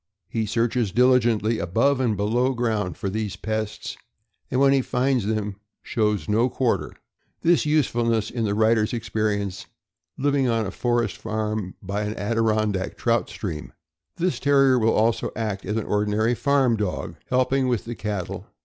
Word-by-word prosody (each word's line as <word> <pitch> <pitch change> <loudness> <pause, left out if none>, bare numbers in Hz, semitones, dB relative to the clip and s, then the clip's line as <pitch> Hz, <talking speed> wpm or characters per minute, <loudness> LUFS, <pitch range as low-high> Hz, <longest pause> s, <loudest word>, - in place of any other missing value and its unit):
He 110 -2 -2
searches 115 -1 0
diligently 120 -2 +3
above 115 +10 +2
and 115 -5 +1
below 120 +6 +1
ground 110 -6 -1
for - - -3
these 105 0 -2
pests, 110 +1 -4 0.5
and 125 - 0
when 140 0 +5
he 135 - +3
finds 125 -3 0
them 105 -2 -2 0.3
shows 105 -3 0
no 115 +4 +2
quar 125 -1 +1
ter. - - -8 0.5
This 170 -2 +3
usefulness 120 -7 +1
in 120 -2 -2
the 100 -1 0
writer's 110 0 +2
experience, 105 -4 -2 0.5
living 140 -1 +1
on 115 -2 +1
a 95 - -4
forest 120 -4 0
farm, 110 -3 -3
by 100 +2 -2
an 105 +1 -3
Adirondack 110 -2 0
trout 115 -1 +1
stream. 80 -7 -6 0.4
This 170 -8 -1
Terrier 135 -2 +4
will 115 0 +3
also 115 +1 +1
act 105 -4 -3
as 105 - -1
an 110 - -2
ordinary 105 +3 +1
farm 135 -2 +2
dog, 105 -4 -3
helping 130 +1 +2
with 120 -4 0
the 120 - -4
cat 105 -5 -3
tle. - - -8
110 Hz, 160 wpm, -24 LUFS, 105-125 Hz, 0.5 s, when